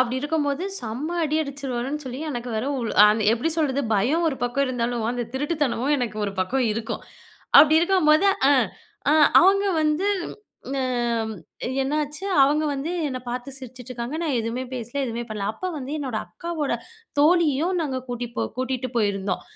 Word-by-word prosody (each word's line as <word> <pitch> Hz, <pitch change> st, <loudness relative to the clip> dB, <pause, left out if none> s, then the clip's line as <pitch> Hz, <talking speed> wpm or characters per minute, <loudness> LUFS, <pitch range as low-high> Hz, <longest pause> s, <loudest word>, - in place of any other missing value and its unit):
அப்டி 255 Hz, 0 st, +1 dB
இருக்கும்போது, 295 Hz, +1 st, -1 dB, 0.2 s
செம்ம 265 Hz, +10 st, -4 dB
அடி 305 Hz, +1 st, 0 dB
அடிச்சுருவாருன்னு 275 Hz, 0 st, -3 dB
சொல்லி 255 Hz, +2 st, -6 dB
எனக்கு 245 Hz, -1 st, -4 dB
வேற 220 Hz, +3 st, -1 dB
உள் 235 Hz, -, -2 dB, 0.2 s
அந் 210 Hz, +1 st, +4 dB
எப்டி 240 Hz, +8 st, 0 dB
சொல்றது? 280 Hz, -3 st, +1 dB
பயம் 275 Hz, +12 st, +2 dB
ஒரு 270 Hz, -, -3 dB
பக்கம் 250 Hz, +3 st, +1 dB
இருந்தாலும், 240 Hz, -2 st, -1 dB
அந்த 245 Hz, -1 st, -2 dB
திருட்டுத்தனமும் 290 Hz, -1 st, 0 dB
எனக்கு 225 Hz, -4 st, -3 dB
ஒரு 200 Hz, -, -3 dB
பக்கம் 250 Hz, +7 st, +1 dB
இருக்கும். 225 Hz, +1 st, -4 dB, 0.6 s
அப்டி 310 Hz, +1 st, +6 dB
இருக்கும்போது, 345 Hz, -1 st, +4 dB, 0.2 s
அ -, -, +7 dB, 0.6 s
அ -, -, +5 dB, 0.3 s
அவங்க 395 Hz, +2 st, +4 dB, 0.2 s
வந்து 310 Hz, +6 st, +1 dB, 0.7 s
ம் 240 Hz, -4 st, -1 dB, 0.5 s
என்னாச்சு 295 Hz, +4 st, -2 dB, 0.2 s
அவங்க 300 Hz, +3 st, +3 dB
வந்து 280 Hz, +5 st, -3 dB, 0.2 s
என்ன 255 Hz, -1 st, -4 dB
பாத்து 250 Hz, +3 st, -4 dB
சிரிச்சிட்டுருக்காங்க, 255 Hz, +1 st, -7 dB
நான் 290 Hz, -6 st, 0 dB
எதுமே 230 Hz, +3 st, -3 dB
பேசல, 240 Hz, +2 st, -6 dB
எதுமே 235 Hz, 0 st, -3 dB
பண்ணல. 210 Hz, -2 st, -3 dB
அப்ப 370 Hz, -, -6 dB
வந்து 265 Hz, +1 st, -6 dB
என்னோட 260 Hz, -6 st, -3 dB
அக்காவோட 325 Hz, -6 st, -3 dB, 0.5 s
தோழியும் 325 Hz, +1 st, +3 dB
நாங்க 275 Hz, -5 st, -2 dB
கூட்டி 245 Hz, 0 st, -3 dB, 0.3 s
கூட்டீட்டு 255 Hz, 0 st, -2 dB
போயிருந்தோம். 200 Hz, -3 st, 0 dB
265 Hz, 150 wpm, -24 LUFS, 240-300 Hz, 0.7 s, அ